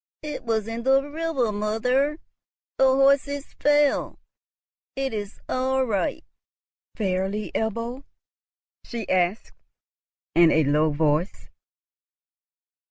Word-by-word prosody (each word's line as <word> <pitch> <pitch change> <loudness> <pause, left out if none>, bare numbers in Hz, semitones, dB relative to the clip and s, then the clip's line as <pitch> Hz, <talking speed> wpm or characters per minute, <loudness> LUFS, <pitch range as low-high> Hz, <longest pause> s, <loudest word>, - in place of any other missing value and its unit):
"It 300 -1 -5
was 220 -2 0
in 225 +1 -4
the 270 +3 +3
river, 295 -6 -1
mother, 250 +8 0 0.6
the 265 - +6
horses 275 +2 +2
fell; 295 -1 +2 0.8
it 270 -2 -2
is 205 -1 -5
our 260 +1 0
right." 205 -6 -1 0.7
"Fairly, 195 +1 -2
Ebbo?" 230 +4 -3 0.8
she 230 -4 -6
asked 185 +3 0 0.8
in 170 -1 +6
a 160 - +3
low 150 +2 +2
voice. 155 +4 -1
230 Hz, 100 wpm, -24 LUFS, 195-270 Hz, 0.8 s, the